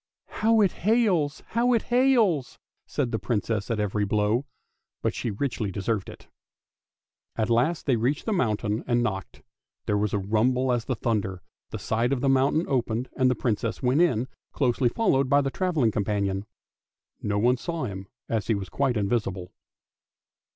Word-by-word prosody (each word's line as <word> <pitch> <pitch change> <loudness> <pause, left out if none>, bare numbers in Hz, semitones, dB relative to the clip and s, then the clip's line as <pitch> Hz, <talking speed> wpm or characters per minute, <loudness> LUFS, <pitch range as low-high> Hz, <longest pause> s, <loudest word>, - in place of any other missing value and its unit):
" - - -67 0.2
How 225 0 +4
it 195 -4 +4
hails, 190 -9 +1
how 240 +2 +2
it 230 - +2
hails! 235 - +3
" - - -56
said 120 - -2
the 110 - -1
Princess 110 -2 -1
at 115 -2 -1
every 105 0 0
blow, 105 +6 +1 0.6
but^she 105 -4 -2
richly 120 -7 -1
deserved 100 +2 -2
it. - - -13 1.1
At 110 +1 0
last 130 +9 +1
they 130 -4 +2
reached 130 +6 0
the 220 - 0
mountain 110 - 0
and 120 -1 +2
knocked; 95 -4 -4 0.4
there 105 0 +1
was 105 -1 0
a - - 0
rumble 120 +6 +1
as 120 -2 0
of 130 - -2
thunder, 100 -5 -2 0.3
the - - -5
side 115 +3 0
of 135 -3 0
the 140 - +2
mountain 135 +5 +3
opened, 120 -2 -1
and 130 -1 +3
the 125 - +1
Princess 115 +1 -2
went 130 +6 +3
in, 130 -8 +2 0.3
closely 125 -2 +2
followed 135 - +1
by 140 - +5
the 135 -1 -1
travelling 160 - +1
companion. 100 -1 -1 0.7
No 105 0 -1
one 120 +4 +3
saw 165 +6 -4
him, 95 -3 -6 0.2
as 110 -4 -1
he 115 - +2
was 95 -2 -5
quite 130 +4 0
invisible. 100 -4 -1
120 Hz, 170 wpm, -26 LUFS, 105-140 Hz, 1.1 s, by